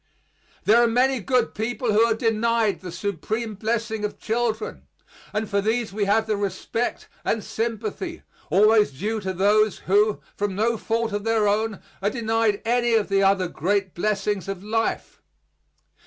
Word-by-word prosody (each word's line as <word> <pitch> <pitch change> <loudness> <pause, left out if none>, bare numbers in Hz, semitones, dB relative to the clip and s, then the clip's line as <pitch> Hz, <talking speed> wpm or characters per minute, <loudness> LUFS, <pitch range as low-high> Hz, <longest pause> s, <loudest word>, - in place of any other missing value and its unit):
There 230 +3 +5
are 240 - +5
many 255 +3 +2
good 245 +2 +1
people 235 +1 -1
who 215 - +5
are 225 - +1
denied 225 -1 +1
the 180 -2 -8
supreme 205 +5 -3
blessing 220 +1 -2
of 210 - -3
children, 225 -1 -2 0.4
and 215 +1 -2
for 200 0 0
these 220 0 -1
we 205 0 0
have 215 +2 +2
the 215 -1 0
respect 205 +4 -3 0.2
and 220 -2 0
sympathy 230 - -4 0.3
always 210 +5 +5
due 210 +11 -3
to 190 -2 -3
those 205 +3 +2
who, 205 +2 +3 0.2
from 200 -2 -2
no 225 +3 +1
fault 225 +1 -1
of 205 0 -2
their 225 -1 +2
own, 215 0 0 0.2
are 200 - +2
denied 225 -3 0
any 240 0 +2
of 215 -2 +1
the 195 0 +3
other 195 -1 +3
great 190 +3 -1
blessings 205 +1 -1
of 195 -1 -5
life. 225 +2 -2
215 Hz, 160 wpm, -24 LUFS, 200-230 Hz, 0.4 s, There